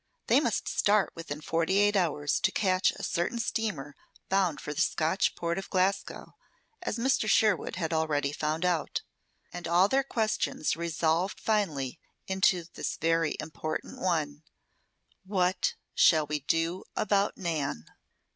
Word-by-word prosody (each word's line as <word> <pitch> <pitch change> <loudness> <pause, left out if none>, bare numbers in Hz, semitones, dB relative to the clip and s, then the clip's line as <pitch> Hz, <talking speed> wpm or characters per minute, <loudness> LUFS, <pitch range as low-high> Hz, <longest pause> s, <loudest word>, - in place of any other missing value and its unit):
They - - +5
must - - -1
start 210 0 +2
within 150 -3 -6
forty 165 +4 0
eight 205 +1 +4
hours 150 -6 +1
to - - +2
catch 185 -2 +2
a - - -6
certain 175 +7 -1
steamer 210 -11 -2 0.4
bound 190 -5 +1
for 150 - -5
the - - -1
Scotch 165 +4 +1
port 170 +2 -2
of 195 - -8
Glasgow, 195 +1 -1 0.5
as - - -3
Mr. 235 -2 +1
Sherwood 215 -5 +3
had 165 -2 -2
already 150 -3 0
found 155 +3 -1
out. 175 -4 0 0.5
And 175 0 -5
all 175 +3 +5
their 270 +4 +2
questions 220 - -1
resolved 170 +2 0
finally 160 - -1 0.3
into 190 -1 +2
this - - -3
very 165 -1 +1
important 155 0 -5
one: 155 -5 -1 0.8
"WHAT 185 -2 0 0.2
SHALL 155 -2 +5
WE 150 0 -2
DO 165 +5 -1
ABOUT 205 -1 +1
NAN?" 150 - -2
170 Hz, 140 wpm, -29 LUFS, 155-195 Hz, 0.8 s, They